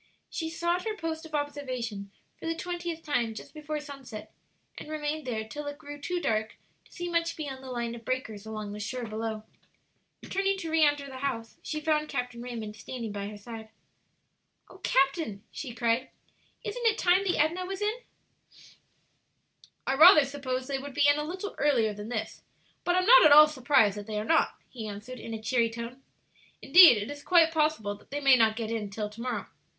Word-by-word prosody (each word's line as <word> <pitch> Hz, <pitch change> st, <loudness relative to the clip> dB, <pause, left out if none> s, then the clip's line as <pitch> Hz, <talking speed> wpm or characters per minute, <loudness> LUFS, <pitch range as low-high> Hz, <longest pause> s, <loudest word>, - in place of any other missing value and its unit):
She 325 Hz, -1 st, -3 dB
sought 345 Hz, +2 st, -1 dB
her 435 Hz, -1 st, -2 dB
post 320 Hz, -2 st, -4 dB
of 310 Hz, -, -5 dB
observation 255 Hz, -8 st, -4 dB, 0.3 s
for -, -, -8 dB
the 330 Hz, -, -1 dB
twentieth 345 Hz, -1 st, -5 dB
time 235 Hz, -7 st, -1 dB
just -, -, -10 dB
before 305 Hz, 0 st, -4 dB
sunset, 275 Hz, -7 st, -9 dB, 0.5 s
and -, -, -9 dB
remained 305 Hz, -1 st, -3 dB
there 220 Hz, -3 st, -3 dB
till 295 Hz, +5 st, -6 dB
it 290 Hz, 0 st, -5 dB
grew 290 Hz, -1 st, -10 dB
too 355 Hz, +4 st, -2 dB
dark 220 Hz, -8 st, -1 dB, 0.3 s
to -, -, -24 dB
see 350 Hz, -1 st, -5 dB
much 335 Hz, -1 st, 0 dB
beyond 270 Hz, -4 st, -6 dB
the 260 Hz, -, -8 dB
line 235 Hz, -2 st, -3 dB
of 235 Hz, -1 st, -9 dB
breakers 220 Hz, -4 st, -3 dB
along 215 Hz, -2 st, -6 dB
the 210 Hz, -, -7 dB
shore 245 Hz, +3 st, -4 dB
below. 220 Hz, 0 st, -4 dB, 0.8 s
Turning 390 Hz, 0 st, 0 dB
to 330 Hz, -4 st, -5 dB
re 320 Hz, 0 st, +3 dB
enter 290 Hz, -1 st, +2 dB
the 265 Hz, -1 st, -8 dB
house, 230 Hz, -5 st, -3 dB
she 305 Hz, -, -4 dB
found 305 Hz, 0 st, 0 dB
Captain 245 Hz, -1 st, -3 dB
Raymond 230 Hz, -4 st, -6 dB
standing 230 Hz, 0 st, -6 dB
by 200 Hz, 0 st, -4 dB
her 210 Hz, 0 st, -8 dB
side. 220 Hz, +1 st, -9 dB, 1.0 s
"O -, -, -14 dB
captain," 270 Hz, -, +1 dB
she 270 Hz, -5 st, -6 dB
cried, 235 Hz, +2 st, 0 dB, 0.5 s
"isn't 465 Hz, +3 st, -1 dB
it 440 Hz, -1 st, +3 dB
time 360 Hz, +2 st, +3 dB
the 375 Hz, -2 st, 0 dB
Edna 325 Hz, +5 st, +1 dB
was 390 Hz, +2 st, -4 dB
in?" 430 Hz, +3 st, -1 dB, 1.9 s
"I -, -, +1 dB
rather 310 Hz, +1 st, +8 dB
supposed 260 Hz, -2 st, -4 dB
they 275 Hz, -1 st, -2 dB
would 280 Hz, 0 st, -8 dB
be 290 Hz, 0 st, +4 dB
in 290 Hz, +1 st, +4 dB
a -, -, -1 dB
little 370 Hz, +6 st, -5 dB
earlier 235 Hz, -7 st, +2 dB
than 210 Hz, +2 st, -8 dB
this, 220 Hz, -3 st, -4 dB, 0.4 s
but 355 Hz, -, +1 dB
am 365 Hz, 0 st, +2 dB
not -, -, +9 dB
at 305 Hz, -, +7 dB
all 300 Hz, +1 st, +11 dB
surprised 255 Hz, -8 st, +3 dB
that 205 Hz, 0 st, -7 dB
they 215 Hz, -1 st, -3 dB
are 210 Hz, -, -4 dB
not," 325 Hz, -, +2 dB
he 225 Hz, -4 st, -7 dB
answered, 215 Hz, +5 st, -8 dB
in 225 Hz, 0 st, -6 dB
a -, -, -5 dB
cheery 235 Hz, -1 st, +2 dB
tone. 235 Hz, +3 st, -7 dB, 0.6 s
"Indeed, 350 Hz, -10 st, +8 dB
it 205 Hz, +6 st, -4 dB
is 290 Hz, 0 st, -8 dB
quite 330 Hz, 0 st, +5 dB
possible 305 Hz, -10 st, +1 dB
that 205 Hz, -, -23 dB
they 285 Hz, -, -3 dB
may 275 Hz, -2 st, +6 dB
not 225 Hz, -3 st, +3 dB
get 225 Hz, -1 st, -4 dB
in 220 Hz, -3 st, -3 dB
till 210 Hz, +1 st, -4 dB
to 210 Hz, +2 st, -11 dB
morrow. 250 Hz, -1 st, -3 dB
270 Hz, 200 wpm, -28 LUFS, 225-315 Hz, 1.9 s, all